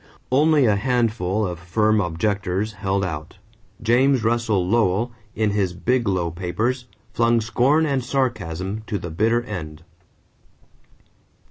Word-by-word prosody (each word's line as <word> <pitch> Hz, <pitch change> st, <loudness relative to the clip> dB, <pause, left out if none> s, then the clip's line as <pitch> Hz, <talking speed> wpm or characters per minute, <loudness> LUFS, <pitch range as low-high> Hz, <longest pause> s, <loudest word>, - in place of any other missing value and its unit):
Only 150 Hz, +1 st, +4 dB
a 105 Hz, -3 st, +3 dB
handful 110 Hz, -4 st, 0 dB
of 90 Hz, -2 st, -4 dB
firm 105 Hz, +5 st, +2 dB
objectors 95 Hz, +3 st, -1 dB
held 100 Hz, -1 st, -1 dB
out. 75 Hz, -2 st, -6 dB, 0.5 s
James 125 Hz, +2 st, +3 dB
Russell 110 Hz, -5 st, +1 dB
Lowell, 115 Hz, +2 st, +1 dB, 0.2 s
in 110 Hz, -1 st, +1 dB
his 100 Hz, -3 st, 0 dB
Biglow 95 Hz, -5 st, 0 dB
Papers, 110 Hz, +9 st, -2 dB, 0.3 s
flung 115 Hz, 0 st, +3 dB
scorn 130 Hz, +8 st, +2 dB
and 135 Hz, -4 st, 0 dB
sarcasm 105 Hz, -, -2 dB
to 105 Hz, -, -1 dB
the 85 Hz, -3 st, -6 dB
bitter 115 Hz, +7 st, +1 dB
end. 80 Hz, -8 st, -7 dB
105 Hz, 120 wpm, -22 LUFS, 90-120 Hz, 0.5 s, Only